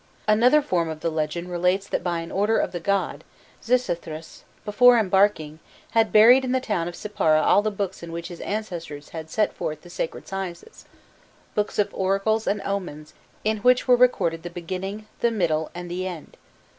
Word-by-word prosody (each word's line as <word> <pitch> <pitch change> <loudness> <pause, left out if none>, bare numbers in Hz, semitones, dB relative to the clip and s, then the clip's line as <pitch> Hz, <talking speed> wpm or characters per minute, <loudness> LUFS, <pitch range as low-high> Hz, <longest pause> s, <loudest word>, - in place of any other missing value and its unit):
'" - - -32
Another 245 +8 +5
form 170 -8 0
of 155 -1 -6
the 165 - -1
legend 160 +3 -3
relates 180 +3 +1
that - - -2
by 170 -2 -1
an 165 - -8
order 210 +3 +1
of - - 0
the 175 - -4
god, 200 +3 -1 0.4
Xisuthros, 170 -10 -2 0.2
before 245 +4 +6
embarking, 190 -7 +2 0.3
had 225 -1 +2
buried 240 +5 +7
in 255 -1 -1
the 260 - +2
town 195 -9 -2
of 175 - -6
Sippara 195 -8 +1
all - - +5
the 215 - 0
books 200 -2 -4
in 170 -1 -8
which 170 0 -6
his 175 - -9
ancestors 170 -9 -5
had 160 -1 -8
set 215 +5 0
forth 155 -1 -5
the 175 - -13
sacred 165 - -5
sciences 195 - -7 0.7
books 210 0 -1
of 205 - +1
oracles 195 +3 0
and 205 0 0
omens, 175 -7 -5 0.3
"in 215 0 +1
which 250 +4 +3
were 250 - +7
recorded 240 -10 +2
the 175 - -6
beginning, 185 +4 -6
the 235 - +2
middle, 165 -8 0
and 175 0 -7
the 185 +1 -3
end. 175 -4 -8
190 Hz, 190 wpm, -24 LUFS, 170-215 Hz, 0.7 s, buried